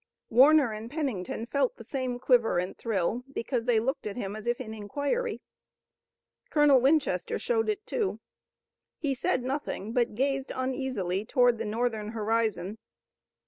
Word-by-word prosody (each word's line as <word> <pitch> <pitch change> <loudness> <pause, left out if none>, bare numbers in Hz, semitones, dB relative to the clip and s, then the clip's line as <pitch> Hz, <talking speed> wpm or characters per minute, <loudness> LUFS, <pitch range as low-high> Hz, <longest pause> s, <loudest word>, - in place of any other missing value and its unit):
Warner 270 0 +6
and 215 +2 -7
Pennington 245 - -3
felt 270 +1 0
the 230 - -10
same 255 0 -3
quiver 245 -5 +3
and 180 +2 -2
thrill, 225 +2 -1
because 240 -2 -2
they 240 -3 +4
looked 250 0 -2
at 200 - -5
him 205 -4 -4
as 215 +1 -8
if 240 0 +1
in 220 -4 -6
inquiry. 285 - -2 1.1
Colonel 295 -4 +5
Winchester 295 +4 +2
showed 450 -2 0
it, 425 0 -2
too. 425 -5 -1 0.8
He 285 -3 -1
said 255 0 0
nothing, 255 -5 -3
but 240 -3 +1
gazed 270 +2 0
uneasily 255 -8 -2
toward 245 0 +3
the 225 - -2
Northern 220 -1 -2
horizon. 220 -2 -1
245 Hz, 145 wpm, -28 LUFS, 220-275 Hz, 1.1 s, Warner